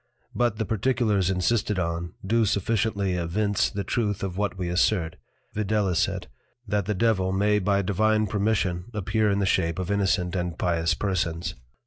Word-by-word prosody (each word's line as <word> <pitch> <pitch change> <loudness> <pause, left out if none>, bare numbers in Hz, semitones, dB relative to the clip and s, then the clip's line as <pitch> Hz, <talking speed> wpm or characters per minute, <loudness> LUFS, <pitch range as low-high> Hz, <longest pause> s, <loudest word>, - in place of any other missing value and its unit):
But 120 -3 +1
the 110 - -1
particulars 110 -4 +1
insisted 100 +2 +1
on, 85 -1 -2
do 115 +3 +2
sufficiently 100 -1 0
evince 100 +4 0
the 100 - -4
Truth 105 -4 -1
of 95 -2 -3
what 100 -1 -1
we 90 -2 -3
assert, 90 -1 +1 0.4
viz. 105 -4 +1 0.6
That 100 -1 0
the 105 - 0
Devil 95 -3 +2
may 105 +2 +2
by 100 0 +1
Divine 110 +3 +2
Permission 100 -4 0
appear 105 +1 +1
in 100 - +1
the 100 - +1
shape 85 -3 +1
of 95 +1 -3
Innocent 95 -3 +1
and 90 -2 -2
Pious 85 -1 +1
Persons. 85 -3 -1
100 Hz, 155 wpm, -26 LUFS, 90-105 Hz, 0.6 s, do